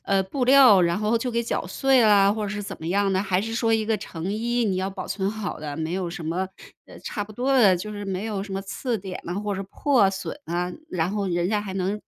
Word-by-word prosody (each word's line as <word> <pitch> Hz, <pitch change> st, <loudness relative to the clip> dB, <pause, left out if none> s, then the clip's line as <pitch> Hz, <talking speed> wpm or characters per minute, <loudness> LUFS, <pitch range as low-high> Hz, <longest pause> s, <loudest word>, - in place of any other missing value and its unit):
呃， 195 Hz, -1 st, +2 dB
布 250 Hz, +6 st, -2 dB
料 255 Hz, -7 st, +7 dB
然 170 Hz, +2 st, +1 dB
后 215 Hz, +2 st, +1 dB
就 245 Hz, +2 st, -2 dB
给 235 Hz, 0 st, 0 dB
绞 225 Hz, -, -2 dB
碎 265 Hz, +7 st, +3 dB
啊， 200 Hz, -2 st, +5 dB
或 215 Hz, 0 st, -3 dB
者 205 Hz, -, -2 dB
是 205 Hz, 0 st, -4 dB
怎 195 Hz, 0 st, -7 dB
么 160 Hz, -, -7 dB
样 195 Hz, +2 st, +1 dB
呢？ 190 Hz, +1 st, +1 dB
还 190 Hz, -2 st, +1 dB
是 225 Hz, +2 st, -4 dB
说 230 Hz, -1 st, +1 dB
一 220 Hz, -1 st, +1 dB
个 220 Hz, -1 st, +1 dB
成 180 Hz, -2 st, -6 dB
衣 235 Hz, +3 st, 0 dB
你 195 Hz, -4 st, 0 dB
要 190 Hz, +1 st, -1 dB
保 190 Hz, -1 st, -6 dB
存 195 Hz, 0 st, -1 dB
好 215 Hz, -3 st, -5 dB
的 150 Hz, -2 st, -6 dB
没 160 Hz, +2 st, -3 dB
有 180 Hz, -3 st, -2 dB
什 170 Hz, -, -7 dB
么， 180 Hz, +4 st, -1 dB, 0.4 s
呃， -, -, -13 dB
差 205 Hz, -, -4 dB
不 215 Hz, -, -13 dB
多 265 Hz, +4 st, +1 dB
的， 200 Hz, -7 st, +6 dB
就 185 Hz, +5 st, -6 dB
是 205 Hz, -1 st, -6 dB
没 195 Hz, +1 st, -3 dB
有 205 Hz, -3 st, -3 dB
什 200 Hz, -, -8 dB
么 195 Hz, -, -2 dB
次 225 Hz, +4 st, -3 dB
点 185 Hz, -1 st, -7 dB
呐 175 Hz, -, -4 dB
或 205 Hz, -1 st, -2 dB
者 195 Hz, -, -3 dB
破 235 Hz, 0 st, +2 dB
损 195 Hz, +8 st, -6 dB
啊， 175 Hz, +1 st, -2 dB, 0.2 s
然 175 Hz, 0 st, 0 dB
后 205 Hz, -1 st, -2 dB
人 175 Hz, 0 st, 0 dB
家 210 Hz, -1 st, +1 dB
还 200 Hz, -2 st, -6 dB
能 190 Hz, +2 st, -1 dB
200 Hz, 295 characters per minute, -24 LUFS, 185-220 Hz, 0.4 s, 料